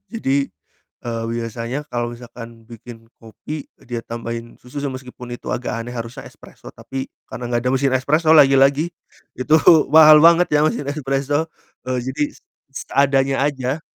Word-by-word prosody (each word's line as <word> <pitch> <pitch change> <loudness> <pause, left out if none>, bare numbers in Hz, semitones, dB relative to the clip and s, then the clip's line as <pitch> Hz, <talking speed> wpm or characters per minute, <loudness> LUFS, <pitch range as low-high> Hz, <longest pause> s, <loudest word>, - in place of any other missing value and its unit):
Jadi, 140 - -1 0.6
eee, 115 -1 -3
biasanya 115 +4 -4
kalau 120 0 -2
misalkan 115 -1 -12
bikin 115 0 -13
kopi 140 +6 -8 0.2
dia 120 -1 -5
tambahin 115 0 -7
susu 125 +4 -8
se 140 - -2
meskipun 125 -2 -8
itu - - -6
agak 125 - -3
aneh 120 - -8
harusnya 120 +2 -7
espreso, - - -15
tapi 135 0 -7 0.2
karena 125 - -7
gak 120 - 0
ada - - +1
mesin 135 0 +1
espreso 155 +5 +2
lagi-lagi 140 +1 +5 0.5
itu 140 +5 +1 0.4
mahal 155 -1 +9
banget 170 +1 +6
ya 150 - +3
mesin 145 - -2
espreso 145 +2 -1 0.4
jadi 130 +3 -2
s - - -22 0.3
seadanya 135 -1 +1
aja. 135 +1 -2
130 Hz, 145 wpm, -20 LUFS, 120-145 Hz, 0.6 s, mahal